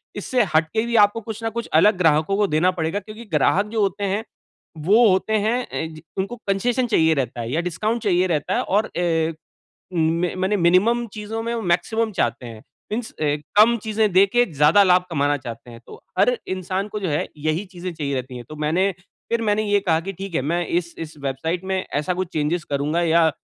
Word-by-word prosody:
इससे 250 -3 +1
हट 160 0 +4
के 220 +1 +1
भी 235 0 -2
आपको 205 +2 +1
कुछ 220 +1 -7
ना 225 - 0
कुछ 235 - -5
अलग 205 +4 +5
ग्राहकों 160 +2 +2
को 210 - +2
देना 170 +3 +2
पड़ेगा 175 +2 -2
क्योंकि 215 +3 -11
ग्राहक 175 +7 +3
जो 225 -2 0
होते 200 +1 -1
हैं 200 +3 -1 0.6
वो 220 +6 +6
होते 190 +3 +1
हैं 240 +3 0
ए 160 - -2
जी, 155 0 -12
उनको 195 +5 -2
कंसेशन 240 +6 +1
चाहिए 160 -7 +3
रहता 125 -3 -2
है 115 +1 -5
या 160 +5 0
डिस्काउंट 215 +7 -2
चाहिए 185 -2 +2
रहता 155 -5 -1
है - - +1
और 210 +3 0
ए 165 -2 +1 0.6
में 165 +1 +1
माने 190 +3 +1
मिनिमम 200 +7 +3
चीज़ों 215 +1 -5
में 235 +1 -2
वो 230 - -2
मैक्सिमम 210 +5 0
चाहते 120 - -1
हैं। 110 -2 -10 0.3
मीन्स 230 +1 -3
अ, 155 - -4 0.4
कम 235 +2 +6
चीज़ें 215 -2 +1
दे 190 +2 +6
के 240 +5 +3
ज़्यादा 150 +8 +5
लाभ 180 -1 +4
कमाना 145 -2 +1
चाहते 120 -1 -9
हैं। 115 -1 -12
तो - - -13 0.2
हर - - +3
इंसान 185 +2 -3
को 210 0 -5
जो 190 - -2
है 145 -1 0
यही 155 +5 -1
चीज़ें 180 -1 -7
चाहिए 145 -3 -3
रहती 130 -1 -5
है। 120 - -7
तो 155 - -8
मैंने 165 +6 +1 0.4
फिर 230 0 0
मैंने 210 0 +1
ये 205 -1 +2
कहा 165 -4 +1
कि 195 - -3
ठीक 190 0 -7
है - - +1
मैं 170 +4 -1
इस 170 +1 -2
इस 155 -1 -7
वेबसाइट 160 +7 -2
में 190 0 -1 0.2
ऐसा 180 +5 -1
कुछ 185 0 -3
चेंजेज 155 +2 0
करूँगा 145 +4 0
या 165 -1 +4
180 Hz, 220 wpm, -22 LUFS, 160-210 Hz, 0.6 s, वो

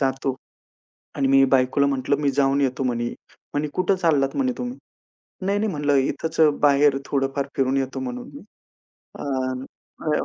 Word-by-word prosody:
जातो" 135 -1 0 0.8
आणि 135 -1 +1
मी 135 0 +6
बायकोला 130 +2 +3
म्हटलं, 135 0 0
"मी 140 -1 +2
जाऊन 140 0 +2
येतो." 130 -1 0
म्हणे. 120 -1 -1 0.5
म्हणे, 150 +1 0
"कुठे 185 +1 +1
चाललात," 150 -6 +1
म्हणे, 260 -2 +1
"तुम्ही?" 245 +1 -5 0.7
"नाही, 200 +1 +1
नाही" 215 - 0
म्हटलं, 145 -2 +1 0.2
"इथंच 160 0 -5
अ, 155 - +7 0.2
बाहेर 140 -1 +4
थोडंफार 135 0 -1
फिरून 135 0 +1
येतो 135 -1 -2
म्हणून 250 -1 -5
मी." 285 - -10 0.8
अ, - - -6 0.8
अ, 150 - +1
140 Hz, 160 wpm, -23 LUFS, 135-160 Hz, 0.8 s, अ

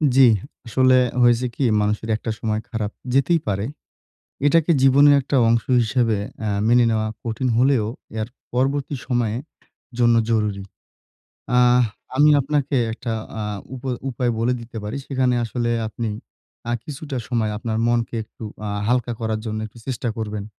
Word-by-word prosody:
জি। 135 - +7 0.5
আসলে 130 +3 +4 0.3
হয়েছে 120 +1 +4
কি, - - -6 0.2
মানুষের 105 +2 -1
একটা 110 +1 -3
সময় 110 -1 -1
খারাপ 110 -2 -3 0.2
যেতেই 160 +5 +3
পারে। 100 0 -1 0.8
এটাকে 165 +3 +4
জীবনের 140 +2 +6
একটা 140 +1 -2
অংশ 115 0 +3 0.2
হিসেবে 115 -2 +1 0.3
আ - - 0 0.2
মেনে 120 +1 +5
নেওয়া 110 0 0 0.2
কঠিন 120 +3 -2
হলেও, 130 -3 +3 0.3
এর 110 - -2 0.3
পরবর্তী 135 +3 0
সময়ের 120 -1 0 0.6
জন্য 120 -1 +5
জরুরি। 105 -3 0 1.0
আহ 125 0 +5 0.3
আমি 150 +2 +6
আপনাকে 140 0 0 0.2
একটা 115 0 -4 0.3
আ - - -2 0.3
উপায় 130 -1 -3
উপায় 125 -1 0
বলে 115 +2 +1
দিতে 115 0 -11
পারি। 105 +6 -4
সেখানে 130 -2 +1
আসলে 120 +1 -2 0.2
আপনি 115 +1 -4 0.6
আ - - +1
কিছুটা 145 -1 -6
সময় 115 -4 0
আপনার 110 0 -3
মনকে 120 0 0
একটু 110 - -17 0.2
আ - - -2 0.2
হালকা 120 -1 +1
করার 110 -1 -1
জন্য 110 0 -3
একটু 110 - -15
চেষ্টা 130 -2 -2
করবেন। 105 -2 -4
120 Hz, 150 wpm, -22 LUFS, 110-130 Hz, 1.0 s, জি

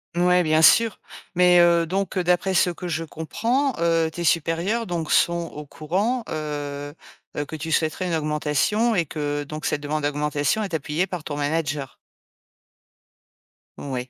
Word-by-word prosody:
Mouais, 180 0 +3
bien 155 0 +3
sûr, 225 +6 +5 0.4
mais, 180 0 +5
heu, 170 -1 +5
donc, 195 +4 -2
heu, 185 - +1
d'après 180 +2 +1
ce 180 - +3
que 175 +1 -6
je 165 0 -2
comprends, 230 - -1
heu, 165 -1 +2
tes 170 +2 -6
supérieurs, 170 +8 0
donc 170 -3 -3
sont 170 -1 +2
au 150 0 -8
courant, 195 - -2
heu 145 -2 -5 0.4
heu, 145 - -1
que 160 - -7
tu 160 +2 -5
souhaiterais 160 +4 0
une 170 - 0
augmentation 155 +9 +1
et 170 -4 +1
que, 145 -1 -3
donc 155 +2 -7
cette 145 - -1
demande 150 0 -3
d'augmentation 145 +6 0
est 195 -4 -6
appuyée 160 +3 -1
par 180 -4 -6
ton 145 - -4
manager? 145 -2 -2 1.8
Ouais. 130 -2 -5
165 Hz, 160 wpm, -23 LUFS, 150-180 Hz, 1.8 s, sûr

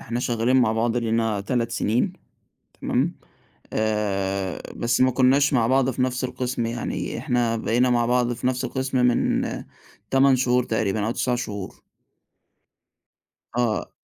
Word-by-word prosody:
إحنا 120 +1 -4
شغّالين 120 +1 +1
مع 120 -4 +3
بعض 115 +1 0
لينا 115 -3 0
3 115 +2 -1
سِنين 115 +1 0 0.7
تمام؟ - - 0 0.6
آآ 100 -3 -1
بس 120 +1 0
ما 130 - +4
كُنّاش 135 +3 +3
مع 115 -3 +3
بعض 130 0 +3
في 130 0 -2
نَفْس 130 0 -1
القِسْم 125 -2 -2
يعني 120 +1 -3
إحنا 120 -2 0
بقينا 120 +3 +1
مع 120 -1 +2
بعض 125 0 +1
في 120 +1 -3
نَفْس 125 -1 -1
القِسْم 130 0 -2
من 120 - +2 0.7
8 135 0 +5
شهور 125 -1 +2
تقريبًا 110 -2 -1
أو - - 0
9 125 +1 0
شهور. 100 -5 -6 1.7
آه. 120 -3 0
120 Hz, 140 wpm, -23 LUFS, 110-125 Hz, 1.7 s, 8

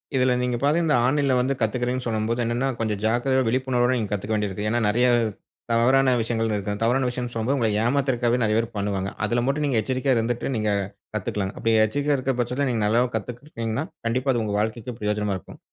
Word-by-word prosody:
இதில 130 -1 +3
நீங்க 125 -1 0
பாத்தீங்கனா 155 +4 +3
இந்த 150 - +3
ஆன்லைன்ல 140 0 +2
வந்து 135 +2 0
கத்துகிறேன்னு 125 +3 0
சொல்லும்போது, 115 +1 -1
என்னன்னா 120 +3 0
கொஞ்சம் 105 -3 -1
ஜாக்கிரதையா 130 +3 +2
விழிப்புணர்வோடு 130 0 +1
நீங்க 105 -4 -2
கத்துக்க 105 +2 -2
வேண்டியிருக்கு. 105 0 -2
ஏன்னா 120 +1 +1
நெறைய 120 +4 +2 0.7
தவறான 130 +3 +4
விஷயங்கள்னு 115 -1 -1
இருக்கு. 100 +1 -3
அந்த 105 - -3
தவறான 125 +2 +2
விஷயம் 125 0 -4
சொல்லும்போது 115 +5 0
உங்களை 115 -3 +1
ஏமாத்துறதுக்காகவே 125 -2 +1
நெறைய 110 0 +2
பேர் 115 0 0
பண்ணுவாங்க. 100 -1 -2
அதில 120 +2 0
மட்டும் 145 +2 0
நீங்க 130 -6 +1
எச்சரிக்கையா 130 +1 0
இருந்துட்டு 120 +3 -1
நீங்க 110 -1 0 0.5
கத்துக்கலாம்ங்க. 100 -1 -3
அப்படி 115 0 +1
எச்சரிக்கையா 145 +5 0
இருக்க 130 +1 -1
பட்சத்தில 125 +3 0
நீங்க 115 -3 0
நல்லாவும் 120 +4 +2
கத்துக்கிட்டீங்கனா, 120 +3 -4 0.2
கண்டிப்பா 130 +3 +1
அது 120 - 0
உங்க 105 -1 -2
வாழ்க்கைக்கு 115 +2 -3
பிரயோஜனமா 105 -1 -1
இருக்கும். - - -14
120 Hz, 185 wpm, -24 LUFS, 110-130 Hz, 0.7 s, தவறான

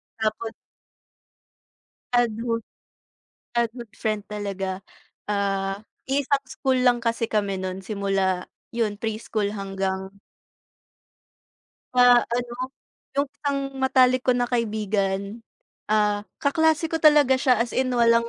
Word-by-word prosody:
Tapos 220 +1 -2 1.6
Ah, 245 0 +5
good 230 0 -2 1.0
ah, 235 - +3
good 235 -4 -9
friend 215 -2 -2
talaga. 195 -2 -4 0.5
Ah, 195 -1 -1 0.2
iisang 275 0 +1
school 260 0 0
lang 245 -1 +3
kasi 230 -1 0
kami 200 -3 0
nun 185 0 -4
simula 195 -2 0 0.2
yun 225 -3 0
preschool 215 -1 -2
hanggang 195 -1 -3 1.8
Ah, 245 -1 +8
ano, 240 0 -2 0.6
yung 280 +1 +2
isang 285 -1 -2 0.2
matalik 255 -1 +4
ko 255 -1 +2
na 245 - +2
kaibigan, 210 -3 -1 0.5
ah, 210 -1 +2 0.2
kaklase 320 +2 +2
ko 325 0 -1
talaga 295 -4 +6
siya, 255 -2 +4
as 240 - -9
in, 260 0 +1
walang 235 -1 +3
230 Hz, 110 wpm, -24 LUFS, 200-250 Hz, 1.8 s, Ah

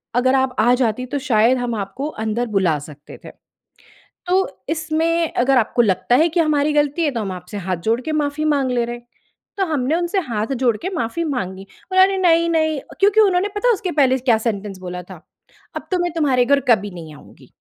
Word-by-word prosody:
अगर 255 +2 +3
आप 260 -1 0
आ 240 +3 +4
जातीं 250 -1 -1
तो 285 +3 -3
शायद 250 -2 +2
हम 245 -2 -2
आपको 210 +7 -4 0.2
अंदर 225 +3 -1
बुला 180 -6 +2
सकते 145 -1 -13
थे। - - -9 1.0
तो 375 +2 +2 0.2
इसमें 320 +1 0
अगर 260 +2 +2
आपको 240 +1 +2
लगता 205 +2 +1
है 320 +5 +4
कि 340 +1 0
हमारी 300 -2 +1
गलती 295 +2 +1
है 300 - +2
तो 240 -4 -4
हम 200 -3 -4
आपसे 180 +3 -9
हाथ 185 -1 -2
जोड़ 230 +2 +2
के 310 +5 -4
माफ़ी 300 0 -1
माँग 270 -2 0
ले 240 -1 +1
रहे।" 240 0 -5 0.6
तो 390 - +2
हमने 295 -3 0
उनसे 345 +3 -1
हाथ 220 +4 -2
जोड़ 235 -3 +3
के 365 - -2
माफ़ी 305 +6 -2
माँगी। 195 - -4 0.3
"अरे 380 +1 +4
नहीं-नहीं" 330 -4 +2 0.2
क्योंकि 410 +2 +4
उन्होंने 390 -2 +3
पता 485 +4 +3
उसके 370 -2 -4
पहले 265 -3 +3
क्या 240 -3 +2
सेंटेंस 210 -3 -4
बोला 180 -1 -7
था, 180 -1 -12 0.6
"अब - - -6
तो 365 - +2
मैं 350 -2 -2
तुम्हारे 275 -7 +2
घर 280 +1 +3
कभी 205 -4 +3
नहीं 165 -4 -10
आऊँगी। - - -17
260 Hz, 200 wpm, -20 LUFS, 220-320 Hz, 1.0 s, आ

